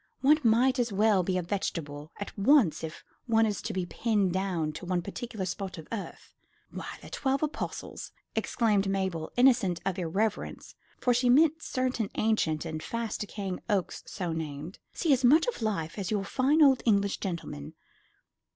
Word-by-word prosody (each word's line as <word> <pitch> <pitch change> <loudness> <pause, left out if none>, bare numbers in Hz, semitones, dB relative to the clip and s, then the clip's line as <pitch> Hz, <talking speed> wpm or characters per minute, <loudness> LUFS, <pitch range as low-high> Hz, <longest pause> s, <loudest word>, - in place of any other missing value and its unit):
One 300 +3 +5
might 250 +2 +3
as 240 -2 +1
well 205 -1 +3
be 185 +1 -1
a 180 - -1
vegetable 160 -5 -4
at 205 - -6
once 215 - +4
if 160 -1 -6 0.2
one 225 -1 +4
is 210 -2 -2
to - - -4
be 185 -1 -2
pinned 205 -1 0
down 185 -5 -1
to 170 - -8
one 180 -1 0
particular 210 0 -5
spot 185 0 -4
of 160 - -9
earth. 220 -4 -7 0.4
Why, - - -6 0.2
the - - -11
Twelve 270 +1 0
Apostles," 300 - -4 0.2
exclaimed 210 -5 +1
Mabel, 190 -5 -2
innocent 235 -9 +4
of 195 -1 -1
irreverence, 195 +5 -2 0.2
for 250 - +2
she 245 +1 +2
meant 315 +5 +5
certain 255 -7 -1
ancient 170 -8 +1
and 155 -1 -4
fast 230 +2 -3
decaying 195 -3 -4
oaks 195 -5 0
so 180 -5 -3
named, 155 +2 -6
"see 320 -5 +2
as 265 0 +1
much 300 +7 +6
of - - -3
life 200 -5 -2
as 190 - -3
your 205 -2 0
fine 275 +9 +3
old 265 -3 +5
English 200 -3 +2
gentleman. 170 - -5
200 Hz, 170 wpm, -29 LUFS, 180-240 Hz, 0.4 s, much